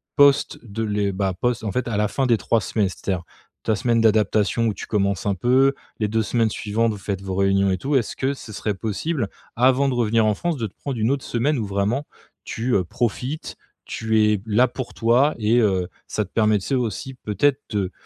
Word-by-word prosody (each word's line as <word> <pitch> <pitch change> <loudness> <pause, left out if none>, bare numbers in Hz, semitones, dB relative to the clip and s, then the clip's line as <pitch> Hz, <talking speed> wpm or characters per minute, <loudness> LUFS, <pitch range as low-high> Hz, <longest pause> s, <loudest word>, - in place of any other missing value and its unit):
Post 140 -1 +4
de 115 -1 -4
les 105 -2 0
bah 95 0 -1
post, 120 +5 -1
en 105 - -2
fait, 125 +5 -2
à 115 - -1
la 105 0 +2
fin 135 +5 -1
des 115 -2 +4
3 115 0 +1
semaines, 100 +2 0
c'est-à-dire, 90 -1 -3 0.4
ta 110 - +1
semaine 115 +2 +1
d'adaptation 110 +1 +2
où 105 - 0
tu - - -7
commences 100 -3 0
un 100 - +2
peu, 130 +7 +3 0.3
les 105 - +1
2 110 +1 +1
semaines 115 +1 +1
suivantes, 110 +3 0
vous 105 - -5
faites 95 -1 -4
vos 95 - -4
réunions 95 0 +2
et 95 - 0
tout. 140 +2 -1
Est-ce 120 -5 0
que 135 +1 0
ce 115 - -10
serait 105 +1 -2
possible 115 - -2 0.3
avant 130 +3 +4
de 130 - -1
revenir 115 -2 +2
en 105 - +2
France 170 +6 -2
de 115 -4 -2
te - - -18
prendre 135 -5 -5
une 110 - +2
autre 140 -1 0
semaine 135 +5 0
où 115 - -2
vraiment 100 +8 -1 0.4
tu, 120 +2 -2
heu, 95 - +3
profites, 125 - -3 0.3
tu 110 0 0
es 105 - +1
b 95 - -13
là 120 +4 +4
pour 125 0 -6
toi 125 +6 +3
et 110 +2 +3
heu, 95 -5 +2 0.2
ça 105 - -2
te 95 - -19
permet, 110 -2 +3
tu 95 - -8
sais, 135 - +1
aussi 125 +2 -3
peut-être 125 +5 +1
te, 105 - -2
heu, 95 -2 -1
110 Hz, 235 wpm, -22 LUFS, 100-125 Hz, 0.4 s, Post